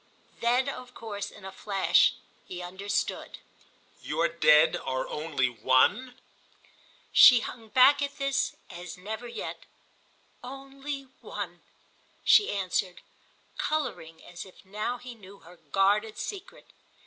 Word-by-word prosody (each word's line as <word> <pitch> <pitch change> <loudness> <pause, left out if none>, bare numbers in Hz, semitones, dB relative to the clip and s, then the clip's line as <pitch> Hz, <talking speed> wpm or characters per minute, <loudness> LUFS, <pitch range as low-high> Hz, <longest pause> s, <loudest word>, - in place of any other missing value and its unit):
Then 245 +3 +2
of 255 -2 -7
course 205 -3 -6
in 190 - -14
a 190 - -7
flash 195 -1 +2 0.3
he 180 - -7
understood. 190 +3 -3 0.6
"Your - - 0
Dead 155 - +5
are 130 0 -3
only 150 -4 -1
One?" 130 - +2 1.0
She 245 -3 +9
hung 225 -1 -8
back 260 +5 +6
at 285 0 -3
this 275 0 0 0.2
as 180 +1 -8
never 220 +6 -6
yet. 235 - -7 0.8
"Only 275 +2 -7 0.2
One," - - -6 0.6
she 415 - +5
answered, 185 -2 -2 0.6
colouring 240 - -3
as 175 -1 -8
if 190 +1 -17
now 210 +5 -3
he 245 0 -10
knew 200 -3 -15
her 175 +2 -15 0.2
guarded 205 +3 +2
secret. 400 -1 -7
210 Hz, 120 wpm, -28 LUFS, 180-255 Hz, 1.0 s, She